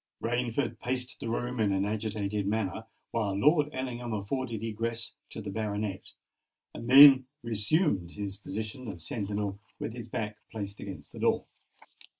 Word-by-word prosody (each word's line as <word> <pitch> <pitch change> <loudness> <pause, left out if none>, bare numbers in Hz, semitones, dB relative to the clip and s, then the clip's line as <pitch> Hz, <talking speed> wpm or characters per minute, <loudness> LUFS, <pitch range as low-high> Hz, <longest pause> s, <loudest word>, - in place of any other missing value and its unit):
Rainford 120 +2 -1
paced 125 0 -3
the 115 - -4
room 120 +1 -2
in 105 -2 +3
an 95 0 +1
agitated 105 -1 -1
manner, 110 0 -1 0.2
while 110 -4 0
Lord 150 +5 +4
Ellingham 125 -4 -3
afforded 115 +2 -3
egress 115 +1 -2 0.2
to - - -6
the 100 - -4
baronet, 105 -2 -3 0.6
and 115 - -6
then 135 -1 +10 0.2
resumed 110 - +1
his 100 -2 -4
position 110 +5 -5
of 95 -5 -6
sentinel 100 +1 -2 0.2
with 115 - -4
his 120 -2 -7
back 110 -3 -3
placed 100 -2 -5
against 95 -2 -8
the - - -9
door. - - +2
110 Hz, 150 wpm, -30 LUFS, 100-120 Hz, 0.6 s, then